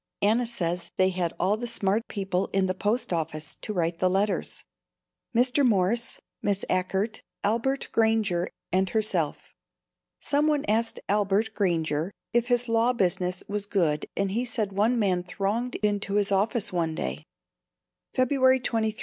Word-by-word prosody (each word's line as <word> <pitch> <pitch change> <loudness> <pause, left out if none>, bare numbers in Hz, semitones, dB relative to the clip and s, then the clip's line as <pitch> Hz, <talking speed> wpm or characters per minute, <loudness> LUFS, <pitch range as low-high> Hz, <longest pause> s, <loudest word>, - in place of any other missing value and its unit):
Anna 230 +4 +3
says 175 -6 -1
they 185 0 +4
had 180 -2 -1
all 195 +4 +2
the 240 +2 -4
smart 220 -1 +1
people 195 -2 -1
in 195 -1 +3
the 185 - 0
post 205 +2 -1
office 155 -2 -3
to - - -4
write 170 -3 -1
the 185 - +3
letters, 200 +3 -1 0.7
Mr. 250 +4 +4
Morse, 230 +1 +2 0.2
Miss 200 -1 -1
Achert, 195 +4 -1 0.2
Albert 235 +6 0
Granger 220 -6 +2 0.2
and 190 +1 +2
herself. 190 -8 -1 0.7
Some 290 +1 +1
one 295 -2 +1
asked 225 +2 0
Albert 205 +2 +1
Granger 165 -4 0 0.2
if 240 0 +2
his 245 0 +2
law 230 +2 +3
business 180 -4 0
was 205 0 -3
good 165 -7 0
and 195 -1 0
he 235 +5 0
said 225 -4 -1
one 220 +5 +2
man 190 -5 +2
thronged 200 +7 -2
into 205 -1 0
his 205 -1 +2
office 200 +1 +1
one 165 -2 0
day. 65 - -3 0.9
February 260 0 +4
23. 220 -3 -1
205 Hz, 150 wpm, -27 LUFS, 185-230 Hz, 0.9 s, they